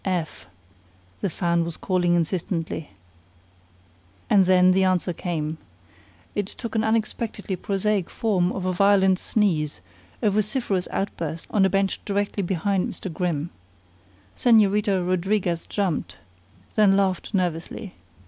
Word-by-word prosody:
"F -, -, -6 dB
F 180 Hz, -4 st, +1 dB
F," 95 Hz, -10 st, -17 dB, 0.7 s
the 200 Hz, -, 0 dB
fan 170 Hz, -1 st, 0 dB
was 165 Hz, -1 st, -5 dB
calling 175 Hz, -2 st, +1 dB
insistently. 165 Hz, -2 st, -2 dB, 1.4 s
And 195 Hz, -2 st, +6 dB
then 185 Hz, 0 st, +6 dB
the 190 Hz, +1 st, +3 dB
answer 185 Hz, -1 st, +1 dB
came. 160 Hz, -2 st, -3 dB, 0.7 s
It 205 Hz, -2 st, -1 dB
took 230 Hz, +2 st, -7 dB
the 225 Hz, -, +1 dB
unexpectedly 220 Hz, -2 st, -1 dB
prosaic 195 Hz, 0 st, -1 dB
form 190 Hz, -5 st, +1 dB
of 190 Hz, -, -4 dB
a 185 Hz, -, 0 dB
violent 190 Hz, 0 st, +4 dB
sneeze, 160 Hz, -, 0 dB, 0.4 s
a 210 Hz, -, +4 dB
vociferous 210 Hz, -2 st, 0 dB
outburst 165 Hz, -4 st, -3 dB
on 200 Hz, -2 st, +4 dB
a -, -, +3 dB
bench 195 Hz, 0 st, 0 dB
directly 200 Hz, 0 st, -1 dB
behind 190 Hz, +1 st, 0 dB
Mr. 185 Hz, -, -7 dB
Grimm. 170 Hz, -2 st, -2 dB, 0.8 s
Señorita 205 Hz, -5 st, +3 dB
Rodriguez 185 Hz, -1 st, 0 dB
jumped, 170 Hz, -, -2 dB, 0.6 s
then 200 Hz, -2 st, +4 dB
laughed 195 Hz, +1 st, 0 dB
nervously. 180 Hz, +2 st, -2 dB
190 Hz, 130 wpm, -24 LUFS, 175-205 Hz, 1.4 s, And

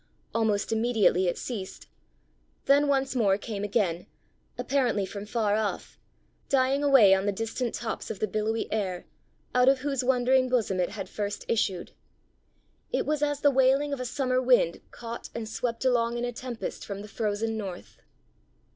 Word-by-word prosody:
Almost 220 Hz, -3 st, 0 dB
immediately 220 Hz, -5 st, +2 dB
it 175 Hz, -, -1 dB
ceased 205 Hz, -7 st, -6 dB, 0.8 s
then 285 Hz, +1 st, +4 dB
once 270 Hz, -1 st, +1 dB
more 200 Hz, -5 st, +3 dB
came 205 Hz, -1 st, -5 dB
again, 195 Hz, -5 st, 0 dB, 0.5 s
apparently 245 Hz, -8 st, +1 dB
from 200 Hz, +2 st, -7 dB
far 215 Hz, -2 st, +1 dB
off, 215 Hz, -1 st, -3 dB, 0.5 s
dying 270 Hz, +1 st, +2 dB
away 265 Hz, -9 st, +7 dB
on 195 Hz, +1 st, +1 dB
the -, -, +3 dB
distant 225 Hz, +4 st, -3 dB
tops 230 Hz, -2 st, -4 dB
of 220 Hz, -, -4 dB
the -, -, +1 dB
billowy 215 Hz, +3 st, -1 dB
air, 190 Hz, -5 st, -2 dB, 0.5 s
out 250 Hz, +1 st, +5 dB
of 270 Hz, -1 st, +2 dB
whose 275 Hz, -2 st, -1 dB
wandering 255 Hz, 0 st, +3 dB
bosom 220 Hz, -7 st, +1 dB
it 180 Hz, -, +1 dB
had 200 Hz, -3 st, -6 dB
first 205 Hz, +1 st, -4 dB
issued. 195 Hz, -6 st, -1 dB, 1.0 s
It -, -, 0 dB
was 300 Hz, -1 st, -1 dB
as 290 Hz, -1 st, 0 dB
the 285 Hz, -, +5 dB
wailing 270 Hz, +2 st, +3 dB
of 280 Hz, -, -3 dB
a 255 Hz, -, -3 dB
summer 255 Hz, 0 st, 0 dB
wind 245 Hz, -9 st, +3 dB
caught 235 Hz, 0 st, -8 dB
and 225 Hz, -2 st, -4 dB
swept 230 Hz, +2 st, -3 dB
along 240 Hz, -2 st, +2 dB
in 240 Hz, -, -1 dB
a 245 Hz, -, -3 dB
tempest 245 Hz, -1 st, -6 dB
from 200 Hz, 0 st, -6 dB
the -, -, -9 dB
frozen 220 Hz, +1 st, -2 dB
north. 195 Hz, -5 st, -7 dB
230 Hz, 165 wpm, -27 LUFS, 205-255 Hz, 1.0 s, away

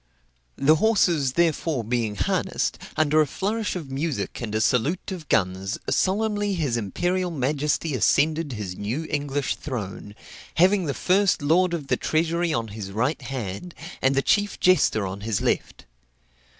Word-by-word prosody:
The 155 Hz, +3 st, +4 dB
horses, 170 Hz, -, +2 dB
therefore, 160 Hz, -5 st, +1 dB
being 115 Hz, -2 st, -1 dB
harnessed, -, -, -1 dB, 0.2 s
under 155 Hz, 0 st, +4 dB
a 150 Hz, -, +2 dB
flourish 210 Hz, +5 st, -2 dB
of 155 Hz, -7 st, -6 dB
music 145 Hz, 0 st, -3 dB
and 110 Hz, -3 st, -4 dB
a -, -, +2 dB
salute 135 Hz, -, +1 dB
of 170 Hz, -5 st, -7 dB
guns, 95 Hz, +2 st, 0 dB
solemnly 205 Hz, 0 st, +1 dB
his 145 Hz, -9 st, 0 dB
imperial 175 Hz, -, -1 dB
majesty 150 Hz, +1 st, -1 dB
ascended 150 Hz, +5 st, +2 dB
his 100 Hz, -5 st, -5 dB
new 120 Hz, -, -3 dB
English 145 Hz, -1 st, -1 dB
throne, 105 Hz, -6 st, -6 dB, 0.4 s
having 185 Hz, +2 st, +4 dB
the 140 Hz, -, -2 dB
first 190 Hz, -3 st, +2 dB
lord 175 Hz, +4 st, +3 dB
of 155 Hz, -4 st, -5 dB
the -, -, 0 dB
treasury 165 Hz, +2 st, 0 dB
on 115 Hz, -6 st, -1 dB
his 100 Hz, -2 st, -7 dB
right 125 Hz, +9 st, -1 dB
hand, 125 Hz, -, -5 dB, 0.3 s
and 135 Hz, +1 st, +3 dB
the 135 Hz, -, +2 dB
chief 205 Hz, -1 st, +1 dB
jester 145 Hz, -, +3 dB
on 95 Hz, +1 st, -5 dB
his 110 Hz, -2 st, -1 dB
left. -, -, -2 dB
145 Hz, 150 wpm, -24 LUFS, 115-175 Hz, 0.4 s, The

